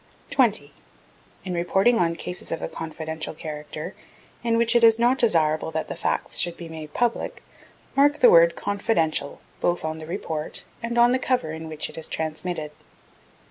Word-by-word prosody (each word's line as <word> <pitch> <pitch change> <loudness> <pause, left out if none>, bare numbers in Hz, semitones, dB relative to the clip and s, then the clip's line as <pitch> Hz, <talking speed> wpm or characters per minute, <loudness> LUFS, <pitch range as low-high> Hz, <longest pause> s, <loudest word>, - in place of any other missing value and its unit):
20. - - +2 0.7
In 185 - -3
reporting 195 +7 +2
on 170 -1 +1
cases 180 +2 -5
of 165 - -1
a - - -3
confidential 160 0 -5
character, 150 -1 -6 0.5
in 230 -1 +2
which 235 +1 +3
it 235 - +5
is 225 -1 +7
not 245 +3 +3
desirable 160 -9 +3
that 160 0 -3
the - - -4
facts - - 0
should 175 -1 +2
be 170 - -8
made 160 -2 -8
public, 240 +7 -1 0.5
mark 290 +2 +4
the 485 - +7
word - - +6
"confidential" 185 -8 -1 0.2
both 175 -2 0
on 160 0 -3
the 155 - -9
report 160 -2 -4 0.2
and 235 +1 -3
on 240 +1 +6
the 255 - +2
cover 250 -12 0
in 160 0 -7
which 155 -1 -2
it - - -7
is 160 - -4
transmitted. 160 0 -3
170 Hz, 175 wpm, -24 LUFS, 160-235 Hz, 0.7 s, is